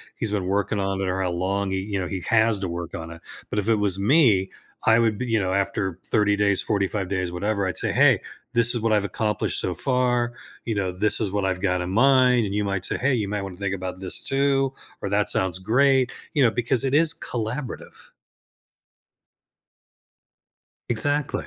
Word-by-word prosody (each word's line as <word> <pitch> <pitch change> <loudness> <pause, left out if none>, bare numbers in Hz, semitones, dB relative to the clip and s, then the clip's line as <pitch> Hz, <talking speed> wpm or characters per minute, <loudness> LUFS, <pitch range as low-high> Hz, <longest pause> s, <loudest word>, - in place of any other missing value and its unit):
he's 110 -2 -3
been 100 -3 -1
working 100 +2 0
on 95 0 -1
it, 95 - -1
or 95 +1 -1
how 90 - 0
long 95 +3 -1
he 95 - -1
you 100 -1 -3
know, 90 - -3
he 95 -2 -4
has 110 -1 +3
to 95 - -3
work 85 0 -5
on 80 -1 -7
it, 80 - -11 0.3
but 105 - 0
if 105 +3 -1
it 115 - +4
was 100 -2 0
me, 105 - +3 0.4
I 115 - +6
would 110 -3 +1
be 125 - -3
you 115 -2 +1
know, 95 -1 -1
after 95 -2 -1
30 105 -2 +2
days, 100 -1 +2
45 100 -2 -1
days, 95 -2 -2
whatever, 100 +2 -1
I'd 95 - -3
say, - - 0
"Hey, - - +4 0.3
this 120 0 +5
is 120 - 0
what 115 -1 0
I've 105 -1 +2
accomplished 105 +2 -2
so 90 - -2
far," 125 +1 0 0.3
you 115 - -1
know, 95 -2 -1
"This 105 +4 +3
is 105 - 0
what 100 -1 -1
I've 95 -1 -1
got 90 -2 0
in 90 - -4
mind," 125 0 +4
and 100 - -4
you 105 - 0
might 100 -1 -2
say, - - -2
"Hey, 130 +2 +1
you 105 -5 -1
might 105 0 -3
wanna 95 -2 -8
think 100 -1 -2
about 95 0 -6
this 95 -1 -2
too," 135 -1 0 0.3
or, 100 - -3
"That 100 +1 +1
sounds 95 -1 0
great," 130 +5 +2 0.2
you 145 - +3
know, 115 - +4
because 120 +2 0
it 135 0 -1
is 165 +1 +4
collaborative. 120 -3 -6 2.8
Exactly. 145 +5 0
105 Hz, 210 wpm, -24 LUFS, 95-120 Hz, 2.8 s, I